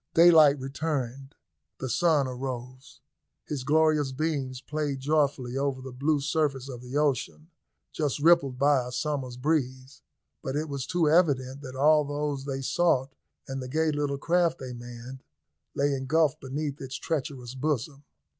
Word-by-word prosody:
Daylight 160 -4 +7
returned; 135 -1 -4 0.4
the 130 - -4
sun 150 0 +2
arose; 130 0 -7 0.4
his 145 -4 -4
glorious 155 -1 +3
beams 135 -3 -2
played 145 -1 -3
joyfully 140 -3 0
over 140 -1 -1
the 130 0 -8
blue 145 +4 +1
surface 140 -2 -1
of 125 -2 -7
the 125 +3 -4
ocean 150 +3 -1 0.4
just 150 -3 -1
rippled 145 -4 +4
by 140 -1 +3
a 125 - -7
summer's 130 -3 -3
breeze, 130 -2 -2 0.4
but 135 - -4
it 155 +2 -1
was 140 -2 -4
too 175 -2 +1
evident 140 -5 +2
that 130 -2 -8
all 150 +3 +5
those 145 -1 -3
they 135 -1 -3
sought 135 -4 +1 0.3
and 135 0 -4
the 130 - -6
gay 155 +4 +1
little 145 -1 -1
craft 170 +2 +1
they 130 -4 -7
manned 120 +2 -9 0.5
lay 140 0 +1
engulfed 150 +3 +1
beneath 140 +2 -4
its 135 -1 -6
treacherous 135 -5 -4
bosom. 140 0 -2
140 Hz, 150 wpm, -27 LUFS, 130-150 Hz, 0.5 s, Daylight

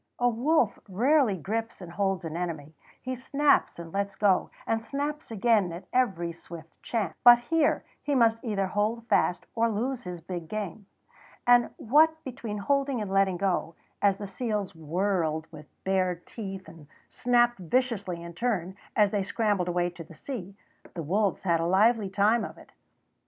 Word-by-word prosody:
A 245 - +2
wolf 245 +1 +2
rarely 240 +1 +3
grips 225 +6 -3
and 180 -3 -9
holds 195 -1 -1
an 160 0 -5
enemy; 160 -4 -4 0.3
he 255 0 -4
snaps 280 +3 +2
and 170 -1 -9
lets 200 0 -2
go, 195 -2 +2 0.2
and 225 0 0
snaps 290 +5 -4
again 220 -4 +2
at 170 +3 -8
every 195 -10 +1
swift 165 -1 -11
chance; 220 -7 -2
but 240 0 +10
here 300 +5 +1 0.2
he 290 - -1
must 230 -2 +3
either 205 -5 0
hold 215 +4 -1
fast 180 - +2
or 230 0 +2
lose 240 +4 -2
his 180 -4 -7
big 170 0 -6
game; 210 -1 -5 0.6
and 245 -1 +5
what 315 +6 +3
between 240 -5 -5
holding 275 +4 0
and 205 -3 -4
letting 195 -2 +2
go, 175 -3 -1 0.3
as 200 -1 +3
the 205 - -6
seals 205 -1 -3
whirled 165 -1 -1
with 150 -2 -11 0.2
bared 185 -2 0
teeth 195 -5 -7
and 160 -2 -13 0.2
snapped 240 -2 +2
viciously 200 -3 -1
in 170 0 -8
turn, 190 -3 -2 0.2
as 205 -2 +4
they 205 - 0
scrambled 200 -2 0
away 175 0 0
to 170 -1 -9
the 165 0 -15
sea, 200 - -7 0.4
the 165 - -4
wolves 195 +6 0
had 170 -3 +2
a 165 - 0
lively 210 +3 +3
time 210 +4 +3
of - - -7
it. - - -16
200 Hz, 170 wpm, -28 LUFS, 180-235 Hz, 0.6 s, but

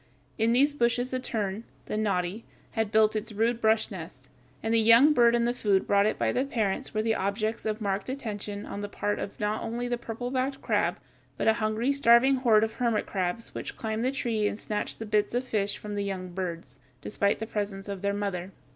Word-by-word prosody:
In 225 +1 +3
these 280 +4 +4
bushes 245 -1 +1
a 255 - 0
tern, 215 -4 -3 0.2
the - - -4
noddy, 200 0 -1 0.3
had 220 -2 -1
built 215 0 +4
its 215 +1 -2
rude 230 +3 0
brush 220 0 +2
nest, - - -9 0.3
and 225 - 0
the 230 - +5
young 230 +7 +7
bird 235 -3 +5
and 235 0 +2
the 240 - +1
food 205 -5 +1
brought 200 0 +3
it - - -1
by - - +1
the 255 - +1
parents 220 -8 -1
were 215 0 -1
the 225 0 +2
objects 215 +3 -1
of 215 0 -1
marked 200 +2 -2
attention 210 -6 -5
on 200 - -6
the 205 - -4
part 205 0 -2
of 195 - -6
not 210 +1 -1
only 240 +2 -3
the 240 -1 -2
purple 240 +1 -5
backed 270 +1 -1
crab 205 -6 0 0.4
but - - -1
a 220 - +6
hungry, 220 +5 +1
starving 265 0 +5
horde 225 -4 +4
of 220 0 -1
hermit 235 -4 0
crabs 185 +3 -3
which - - -6
climbed 220 0 -2
the 255 - +2
tree 230 -6 0
and 205 - -3
snatched 210 -1 -3
the 225 - -6
bits 210 +1 +1
of 245 - +1
fish 205 -5 -1
from 210 -1 -7
the 205 0 -1
young 190 -2 -4
birds, 175 -2 -5 0.2
despite 200 - +1
the 220 - -4
presence 205 -2 -4
of 200 -2 -5
their 200 0 +1
mother. 200 -3 -3
220 Hz, 220 wpm, -28 LUFS, 205-235 Hz, 0.4 s, young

